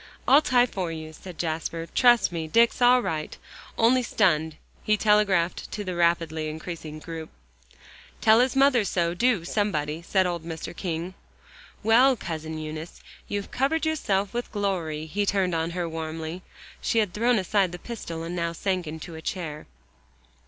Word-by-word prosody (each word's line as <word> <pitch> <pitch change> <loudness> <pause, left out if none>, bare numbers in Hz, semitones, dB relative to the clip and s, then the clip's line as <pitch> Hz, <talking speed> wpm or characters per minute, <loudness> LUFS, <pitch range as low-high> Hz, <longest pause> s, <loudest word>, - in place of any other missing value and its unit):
"I'll 285 +3 +7
tie 250 -4 +4
for 185 -7 -4
you," 155 -1 -7
said 180 +1 -11
Jasper, 165 0 -3
"trust 240 -7 +5
me, 165 -2 -3
Dick's 230 +8 +3
all 245 0 +6
right, 155 -1 -3 0.4
only 245 +3 +4
stunned," 160 -9 +1 0.3
he 215 0 +2
telegraphed 200 -5 +2
to 210 - -3
the 185 -2 -4
rapidly 165 -2 +1
increasing 155 0 -7
group. 160 +1 -7 0.9
"Tell 220 +1 +5
his 255 +1 +2
mother 270 -4 +4
so, 170 -3 0
do, 215 -3 +1
somebody," 165 -7 -1
said 185 +2 +1
old 175 -2 -2
Mr. 165 +1 -6
King. 170 0 -4 0.7
"Well, 245 +5 +5
Cousin 160 -5 -5
Eunice, 155 +1 -7 0.2
you've 205 -1 -4
covered 280 +5 0
yourself 205 -11 0
with 240 0 -3
glory," 175 -7 -2
he 200 +6 -1
turned 195 -3 +1
on 165 0 0
her 175 0 -3
warmly. 160 +1 -5 0.4
She - - 0
had 210 -5 +2
thrown 235 +2 +2
aside 190 -1 +1
the 175 - -6
pistol, 175 -6 -6
and 170 +2 -5
now 170 -1 -1
sank 185 0 -2
into 160 +2 -7
a 160 - -8
chair. 160 -3 -5
180 Hz, 160 wpm, -26 LUFS, 160-215 Hz, 0.9 s, I'll